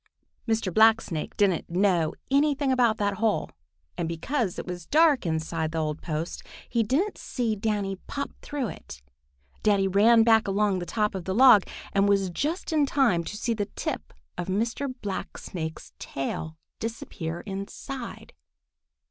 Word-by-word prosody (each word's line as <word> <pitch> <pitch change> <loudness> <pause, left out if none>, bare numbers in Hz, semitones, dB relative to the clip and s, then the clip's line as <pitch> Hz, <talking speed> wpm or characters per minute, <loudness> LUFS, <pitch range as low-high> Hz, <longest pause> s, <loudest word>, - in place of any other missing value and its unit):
Mr. 220 -5 0
Blacksnake 220 -7 +3
didn't 195 -5 +2
know 175 -3 +2 0.2
anything 280 -1 +3
about 240 -4 +3
that 205 -1 0
hole, 220 +1 0 0.4
and 170 - -2
because 190 - -1
it - - -4
was 175 -2 -6
dark 305 - +4
inside 160 0 -1
the - - -2
old 155 -1 -2
post, 160 +1 -4 0.3
he 235 - +1
didn't 290 - 0
see 235 -4 -1
Danny 205 -2 -1
pop 280 0 -4
through 285 -4 -3
it. 65 - -10 0.6
Danny 200 -2 +3
ran 220 +4 +5
back 225 -1 +4
along 200 -1 +1
the 175 - -5
top 210 -2 0
of 190 -3 -5
the 190 - -2
log 235 -5 +8 0.3
and 200 0 +3
was 195 -2 +2
just 320 - -2
in 295 -2 +3
time 245 -12 +2
to 210 - -6
see 235 +2 0
the 205 -3 -2
tip - - -4 0.3
of 175 - -3
Mr. 230 +8 -1
Blacksnake's 175 -4 -5
tail 160 +3 -4 0.2
disappear 175 -7 -5
inside. 210 +6 -7
205 Hz, 150 wpm, -27 LUFS, 175-235 Hz, 0.6 s, log